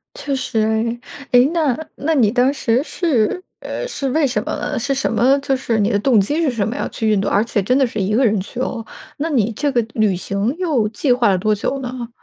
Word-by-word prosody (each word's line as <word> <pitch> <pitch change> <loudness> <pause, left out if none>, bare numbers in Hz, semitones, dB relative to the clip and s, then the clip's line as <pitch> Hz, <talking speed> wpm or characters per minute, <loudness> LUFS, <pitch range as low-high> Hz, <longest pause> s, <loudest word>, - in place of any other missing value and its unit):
确 285 - -3
实 255 -3 -2
哎。 220 +2 0 0.3
诶， 245 +1 +6
那 300 -7 +1 0.2
那 320 +3 -1
你 220 -6 +4
当 255 +3 +2
时 245 -2 +1
是， 315 - 0 0.2
呃， - - -5
是 275 - -3
为 305 +3 +2
什 260 - -1
么 - - -4
呢？ - - -3
是 275 0 0
什 270 - -1
么 255 +5 +3
就 270 -1 0
是 230 -4 -1
你 205 +2 +2
的 205 - +1
动 235 -1 +3
机 290 +12 0
是 300 -6 +1
什 215 -4 -1
么 230 - -4
要 - - -2
去 220 -2 -1
印 200 -2 +2
度？ - - -2
而 205 - +2
且 225 -3 -1
真 250 +7 +1
的 270 - +4
是 225 -3 -4
1 200 +3 0
个 260 - +3
人 215 -3 +2
去 220 +5 -8
哦， 230 -3 -3 0.3
那 320 +3 -2
你 235 -6 +1
这 285 +5 -1
个 240 -2 +2
旅 215 -4 +2
行 200 - -2
又 295 -12 +1
计 250 +4 -1
划 245 -4 +2
了 190 - +3
多 215 +3 +1
久 275 +6 -2
呢？ 245 -2 -6
245 Hz, 265 characters per minute, -19 LUFS, 215-275 Hz, 0.3 s, 诶